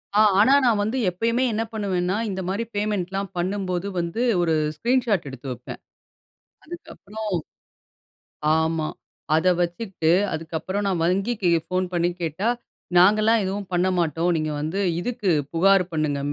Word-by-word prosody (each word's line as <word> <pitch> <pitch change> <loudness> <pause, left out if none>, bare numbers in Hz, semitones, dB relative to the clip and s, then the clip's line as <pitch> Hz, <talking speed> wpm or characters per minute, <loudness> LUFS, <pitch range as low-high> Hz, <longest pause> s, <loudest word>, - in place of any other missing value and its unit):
ஆ - - +5 0.2
ஆனா 245 +6 +6
நான் 220 -4 +3
வந்து 220 +5 -1
எப்பயுமே 230 +7 0
என்ன 225 +1 0
பண்ணுவேன்னா, 190 -3 -1
இந்தமாரி 190 +3 -2
பேமெண்ட்லாம் 195 -2 -2
பண்ணும்போது 185 0 -2
வந்து 170 +7 -2 0.2
ஒரு 165 -2 +1 0.2
ஸ்க்ரீன் 245 - +1
ஷாட் 200 -8 +1
எடுத்து 130 +1 -9
வைப்பேன். 125 - -8 0.8
அதுக்கப்புறம் 220 - -8 1.3
ஆமா. 160 -1 0 0.5
அத 160 +3 +2
வச்சுக்கிட்டு 175 -1 -1 0.2
அதுக்கப்புறம் 165 +5 -3
நான் 180 -4 0
வங்கிக்கு 195 +1 0 0.2
ஃபோன் 185 0 -1
பண்ணி 175 0 +2
கேட்டா, 165 +6 -2 0.5
நாங்கலாம் 215 +4 +5
எதுவும் 195 0 -4
பண்ண 180 +1 +2
மாட்டோம். 165 +1 0
நீங்க 155 -1 -2
வந்து 160 +6 -2 0.2
இதுக்கு 225 -2 -2 0.2
புகார் 195 +3 +4
பண்ணுங்க, 155 -3 -1
190 Hz, 130 wpm, -23 LUFS, 170-210 Hz, 1.3 s, ஆனா